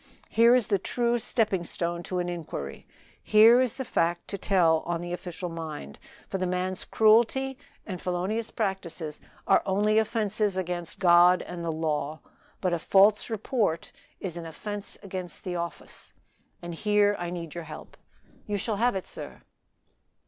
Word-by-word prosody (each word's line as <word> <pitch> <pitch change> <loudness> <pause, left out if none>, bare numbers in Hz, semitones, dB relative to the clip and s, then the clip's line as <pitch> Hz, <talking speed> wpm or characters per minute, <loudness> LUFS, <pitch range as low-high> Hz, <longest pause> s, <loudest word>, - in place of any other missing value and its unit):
Here 235 +2 +6
is 250 -3 +3
the 200 -1 +1
true 240 +4 0
stepping 215 -5 0
stone 170 0 -2
to 185 - -2
an 180 0 -1
inquiry, 160 - -6 0.3
here 225 +4 +7
is 255 -3 0
the 265 - -4
fact 170 -4 0
to 200 - -3
tell 170 -5 +3
on 170 -1 -1
the 175 +1 -5
official 180 0 -5
mind; 160 - -7 0.3
for 195 - -3
the 185 - 0
man's 185 +1 -2
cruelty 235 +5 +3 0.3
and 185 -4 -6
felonious 190 +6 -2
practices 180 -7 -3 0.2
are - - +5
only 210 +3 +2
offenses 215 -2 0
against 175 -2 -3
God 180 -1 +6
and 175 -1 -7
the 165 - -1
law; 155 -1 -2 0.4
but 185 -2 +1
a 170 - 0
false 200 +6 +4
report 220 -6 -1 0.3
is 175 -3 -5
an 165 -1 -6
offense 205 +5 -6
against 185 -4 -7
the 180 -1 -3
office. 170 0 -7 0.5
And 175 0 -5
here 205 +3 +2
I 175 -1 -3
need 170 -3 -6
your 170 -1 -6
help." 155 0 -10 0.5
"You 205 -1 -1
shall 210 +2 -2
have 240 +1 +2
it, 190 - -3
sir." - - -10
185 Hz, 165 wpm, -27 LUFS, 170-210 Hz, 0.5 s, here